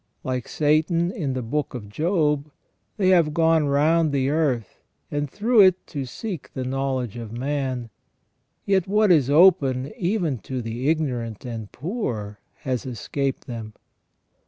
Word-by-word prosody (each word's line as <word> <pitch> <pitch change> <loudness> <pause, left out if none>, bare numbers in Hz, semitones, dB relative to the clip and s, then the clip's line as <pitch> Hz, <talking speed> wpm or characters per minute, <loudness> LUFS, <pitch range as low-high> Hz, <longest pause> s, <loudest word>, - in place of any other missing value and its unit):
Like 125 -2 -3
Satan 160 +3 +1
in 145 -9 -3
the 130 -1 -3
Book 140 +4 -2
of 110 -5 -6
Job, 150 - 0 0.5
they 190 -3 +3
have 165 -5 +4
gone 165 -2 +3
round 155 +3 +3
the 135 -1 +1
earth 135 - -1 0.3
and 145 -1 -2
through 220 - +3
it 185 -1 +4
to 140 -3 -4
seek 185 - -6
the 130 - -2
knowledge 130 -3 -2
of 115 -2 -7
man, 130 -1 -3 0.7
yet 195 -2 +2
what 210 0 +3
is 145 -6 +4
open 145 -5 +4
even 175 - -1
to 130 +3 -5
the 120 +4 -2
ignorant 125 -9 -2
and 115 -4 -6
poor 120 - -4 0.2
has 130 -2 -2
escaped 135 +3 -3
them. 115 -3 -7
140 Hz, 145 wpm, -24 LUFS, 125-165 Hz, 0.7 s, have